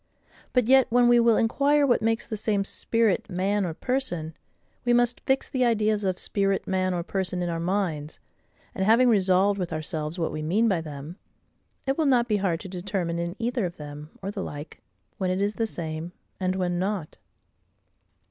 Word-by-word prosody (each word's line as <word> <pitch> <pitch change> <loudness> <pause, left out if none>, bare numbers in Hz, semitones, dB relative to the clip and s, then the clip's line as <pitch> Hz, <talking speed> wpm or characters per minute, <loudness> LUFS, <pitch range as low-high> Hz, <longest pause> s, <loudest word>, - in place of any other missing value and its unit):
But 250 -3 +2
yet, 265 +1 +5
when 245 +1 +4
we 240 0 +6
will 230 -1 +4
inquire 280 +5 +3
what 245 -4 +3
makes 225 +1 0
the 220 - -4
same 205 -1 0
SPIRIT, 225 -1 +1
MAN, 195 +1 0
or 160 - -5
PERSON, 175 -12 -2 0.5
we 240 - +2
must 240 0 +2
fix 265 0 +2
the 255 -1 0
ideas 215 -3 +2
of 185 -2 0
spirit, 195 -1 0
man, 185 0 0
or 170 - -2
person 185 -1 -2
in 175 - -2
our 165 -1 -2
minds; 170 -4 -2 0.5
and 190 - -2
having 230 +5 +5
resolved 195 -1 +3
with 180 -2 -3
ourselves 155 +1 -4
what 165 -2 -1
we 155 - -4
mean 195 +9 +2
by 185 -6 +1
them, 150 +2 -8 0.7
it 270 +3 -1
will 310 - +3
not 245 -3 +3
be 210 -3 +2
hard 185 -5 0
to - - -7
determine, 180 -2 -3
in 170 +1 -3
either 235 -3 -1
of 170 - -10
them, 150 0 -8
or 195 - -2
the 205 -1 -5
like, 145 -4 -7 0.4
when 185 - 0
it 185 +1 0
is 205 +1 0
the 225 0 -1
same, 165 -2 -5 0.3
and 185 -1 0
when 180 -2 -1
not. 190 -4 -3
195 Hz, 195 wpm, -26 LUFS, 170-230 Hz, 0.7 s, we